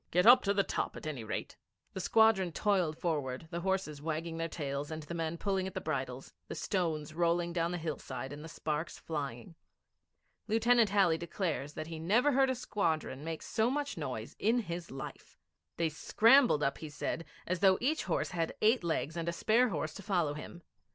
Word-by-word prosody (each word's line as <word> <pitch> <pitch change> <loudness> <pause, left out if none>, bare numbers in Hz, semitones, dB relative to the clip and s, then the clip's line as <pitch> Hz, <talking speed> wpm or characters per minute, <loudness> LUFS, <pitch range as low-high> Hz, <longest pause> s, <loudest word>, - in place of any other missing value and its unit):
'Get 180 +3 +3
up 250 +2 +9
to 200 - +3
the 200 - +4
top - - -2
at - - -9
any 145 -7 -4
rate.' 110 - -5 0.4
The - - -4
squadron 220 -5 +4
toiled 180 -7 +1
forward, 145 -4 -2
the 170 - -2
horses 185 -5 -1
wagging 165 +1 -3
their 165 0 -1
tails 140 -2 -3
and 155 -1 -5
the 150 - -7
men 165 0 -2
pulling 190 0 0
at 190 - -8
the - - -1
bridles, - - -4
the - - -5
stones 160 -6 -1
rolling 170 +1 +1
down 170 0 0
the 180 - -2
hillside 140 -5 -5
and 145 +1 -8
the 165 - -8
sparks 155 +1 -3
flying. 140 -4 -5 0.9
Lieutenant 230 0 +4
Halley 190 -5 +3
declares 165 -4 -3
that 155 - -5
he 165 0 -7
never 225 - +3
heard 270 0 +4
a 260 - +1
squadron 160 - -1
make 160 0 -4
so 220 +2 +1
much 285 +1 -2
noise 125 -8 -5
in 235 +3 +3
his 170 -3 -5
life. 135 0 -8 0.4
They 165 -1 +1
scrambled 225 - +5
up, 140 0 0
he 155 - -6
said, 155 +3 -3 0.2
as 180 0 -1
though 190 0 +5
each 300 +6 0
horse - - -1
had 165 -2 -2
eight 220 0 +4
legs 160 -1 -1
and 170 0 -2
a - - 0
spare 225 +8 +3
horse 155 -3 -3
to - - -8
follow 175 -7 0
him. 165 +3 -9
170 Hz, 200 wpm, -32 LUFS, 155-200 Hz, 0.9 s, up